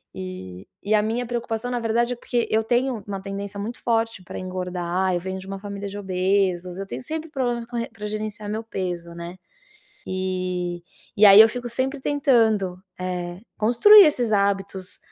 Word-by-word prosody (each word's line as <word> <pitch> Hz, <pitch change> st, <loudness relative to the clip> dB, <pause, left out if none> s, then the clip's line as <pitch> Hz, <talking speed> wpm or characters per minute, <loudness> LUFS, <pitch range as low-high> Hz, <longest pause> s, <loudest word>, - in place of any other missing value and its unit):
E 95 Hz, 0 st, -8 dB, 0.2 s
e 205 Hz, -, 0 dB
a 210 Hz, -, +4 dB
minha 230 Hz, +3 st, -1 dB
preocupação, 240 Hz, 0 st, -3 dB
na 245 Hz, -, -1 dB
verdade, 235 Hz, +2 st, +1 dB
é -, -, -9 dB
porque 240 Hz, -1 st, -1 dB
eu 220 Hz, +1 st, +3 dB
tenho 240 Hz, -1 st, 0 dB
uma 195 Hz, -1 st, -4 dB
tendência 200 Hz, +1 st, -6 dB
muito 225 Hz, +4 st, -5 dB
forte 225 Hz, -4 st, 0 dB
para -, -, -8 dB
engordar, 185 Hz, 0 st, -2 dB
eu -, -, 0 dB
venho 190 Hz, +1 st, -4 dB
de 190 Hz, -, -11 dB
uma 195 Hz, 0 st, -5 dB
família 200 Hz, 0 st, -6 dB
de 200 Hz, -, -7 dB
obesos, 185 Hz, -2 st, 0 dB
eu 195 Hz, -, -4 dB
tenho -, -, -6 dB
sempre 320 Hz, +3 st, -5 dB
problemas 245 Hz, -5 st, -2 dB
com 240 Hz, 0 st, -5 dB
re 235 Hz, -, -2 dB
para 210 Hz, -2 st, -8 dB
gerenciar 215 Hz, 0 st, -5 dB
meu 220 Hz, +2 st, -3 dB
peso, 175 Hz, -5 st, -4 dB
né, 170 Hz, +2 st, -8 dB, 0.7 s
e 185 Hz, -2 st, -2 dB, 0.3 s
e 210 Hz, -, +7 dB
aí 200 Hz, +1 st, +10 dB
eu 225 Hz, -, +6 dB
fico 245 Hz, +1 st, -5 dB
sempre 265 Hz, +4 st, -2 dB
tentando, 225 Hz, -10 st, +2 dB, 0.2 s
eh, 180 Hz, -1 st, -4 dB, 0.2 s
construir 315 Hz, -, +8 dB
esses 245 Hz, -7 st, +1 dB
hábitos, 195 Hz, -2 st, -1 dB
205 Hz, 185 wpm, -24 LUFS, 185-235 Hz, 0.7 s, aí